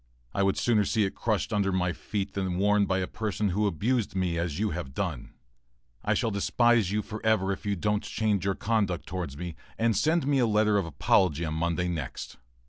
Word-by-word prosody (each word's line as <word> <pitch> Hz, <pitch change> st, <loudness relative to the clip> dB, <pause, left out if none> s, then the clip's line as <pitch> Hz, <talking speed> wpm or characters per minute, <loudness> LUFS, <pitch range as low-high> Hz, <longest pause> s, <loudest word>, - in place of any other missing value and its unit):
I -, -, 0 dB
would 95 Hz, 0 st, +2 dB
sooner 110 Hz, -4 st, +3 dB
see 110 Hz, +2 st, +1 dB
it 95 Hz, -, -1 dB
crushed 110 Hz, 0 st, -1 dB
under 100 Hz, -2 st, +1 dB
my 90 Hz, -1 st, 0 dB
feet 100 Hz, +1 st, -4 dB
than 95 Hz, -2 st, -2 dB
worn 105 Hz, +1 st, +3 dB
by 95 Hz, -, +1 dB
a 95 Hz, -, 0 dB
person 105 Hz, -1 st, -2 dB
who 105 Hz, +3 st, +1 dB
abused 105 Hz, -, 0 dB
me 90 Hz, -3 st, 0 dB
as 85 Hz, -3 st, -2 dB
you 105 Hz, 0 st, 0 dB
have 75 Hz, -6 st, -5 dB
done. -, -, -4 dB, 0.7 s
I -, -, +1 dB
shall 115 Hz, -, 0 dB
despise 115 Hz, 0 st, +2 dB
you 105 Hz, 0 st, 0 dB
for 110 Hz, 0 st, -7 dB
ever 110 Hz, -4 st, +2 dB
if 100 Hz, +2 st, -5 dB
you 100 Hz, -, +1 dB
don't 105 Hz, +3 st, 0 dB
change 105 Hz, -4 st, -1 dB
your 100 Hz, -1 st, 0 dB
conduct 100 Hz, -5 st, 0 dB
towards 90 Hz, -7 st, -5 dB
me, 85 Hz, 0 st, -5 dB, 0.2 s
and 115 Hz, -1 st, +2 dB
send 155 Hz, -, +2 dB
me 140 Hz, -1 st, +2 dB
a 120 Hz, -, +3 dB
letter 105 Hz, -1 st, +3 dB
of 90 Hz, -, -2 dB
apology 80 Hz, +2 st, +2 dB
on 80 Hz, -, -3 dB
Monday 85 Hz, +2 st, 0 dB
next. 80 Hz, -10 st, -5 dB
100 Hz, 215 wpm, -28 LUFS, 90-110 Hz, 0.7 s, sooner